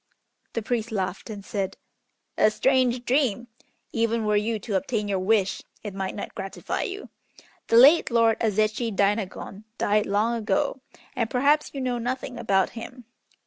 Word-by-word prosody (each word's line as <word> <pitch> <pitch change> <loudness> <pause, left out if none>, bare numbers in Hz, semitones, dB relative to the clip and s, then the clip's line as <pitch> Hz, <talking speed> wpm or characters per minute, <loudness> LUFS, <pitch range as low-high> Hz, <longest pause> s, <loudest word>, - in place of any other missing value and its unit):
The 230 - -2
priest 230 0 -2
laughed, 190 -1 -3
and 205 -2 -7
said, 195 -3 -3 0.6
"A - - +5
strange 250 +1 +2
dream! 245 -3 +1 0.4
even 230 -1 0
were 210 0 +2
you 215 +2 +1
to 210 +1 -6
obtain 210 +2 -1
your 195 -2 0
wish 195 0 +1 0.2
it 205 -3 -5
might 190 -1 -4
not 205 - -6
gratify 195 - -4
you. 395 +2 -5 0.6
The 230 - +4
late 285 +8 +7
Lord 230 -2 +3
Azechi 215 +1 +1
Dainagon 200 0 -1
died 210 0 +1
long 210 +4 +1
ago, 225 +3 -1 0.3
and 230 -2 -1
perhaps 285 +4 +2
you 275 - -3
know 250 -2 -1
nothing 250 +1 -4
about 195 -4 +2
him. 245 +1 -9
225 Hz, 155 wpm, -25 LUFS, 205-245 Hz, 0.6 s, late